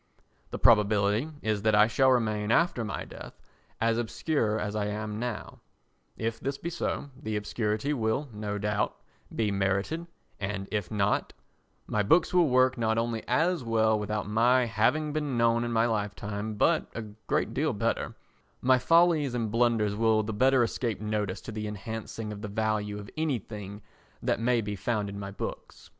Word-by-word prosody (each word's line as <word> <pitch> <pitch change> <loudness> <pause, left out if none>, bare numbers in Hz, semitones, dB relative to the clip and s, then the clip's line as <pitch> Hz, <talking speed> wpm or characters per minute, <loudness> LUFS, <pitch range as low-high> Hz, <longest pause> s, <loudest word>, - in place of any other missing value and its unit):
The - - -4
probability 105 +3 +4
is 110 -2 0
that 110 0 +3
I 105 0 +7
shall 130 +4 +3
remain 110 -4 +1
after 165 -5 +2
my 105 - -4
death - - -11 0.4
as 115 0 +2
obscure 115 -2 0
as 105 0 -3
I 105 -1 0
am 105 0 -4
now; 120 -2 -5 0.6
if 115 0 -2
this 140 +1 -3
be 170 - -5
so, 145 -4 -3
the 110 -2 -4
obscurity 105 +5 -1
will, 120 +3 0
no 105 -1 -3
doubt, 105 0 -1 0.4
be 110 -2 +1
merited, 100 - -1 0.3
and 100 -1 -3
if 105 -4 -2
not, 105 -1 0 0.5
my 105 - 0
books 160 - +3
will 175 -4 +4
work 130 0 +3
not 110 -1 +1
only 115 -1 -1
as 165 +4 +2
well 110 -1 +2
without 105 0 -2
my 120 +4 +4
having 130 +7 +1
been 150 -5 -1
known 115 0 +3
in 120 - -2
my 115 0 +3
lifetime 105 -1 -3
but 165 +10 +2
a 115 - -3 0.2
great - - 0
deal - - +1
better; - - -1 0.4
my 130 0 +4
follies 165 -3 +4
and 115 -3 -1
blunders 115 -3 +2
will 110 0 +3
the 110 +1 -4
better 130 +3 +4
escape 115 -1 -2
notice 105 -3 -2
to - - -7
the 105 0 -4
enhancing 105 +1 -5
of 105 - -9
the 105 - -4
value 105 0 -1
of 105 0 -8
anything 105 -9 -3 0.4
that - - +1
may 120 0 +2
be 105 -1 -4
found 105 0 -1
in 100 0 -6
my 100 -1 -5
books. 100 - -7
110 Hz, 175 wpm, -28 LUFS, 105-125 Hz, 0.6 s, I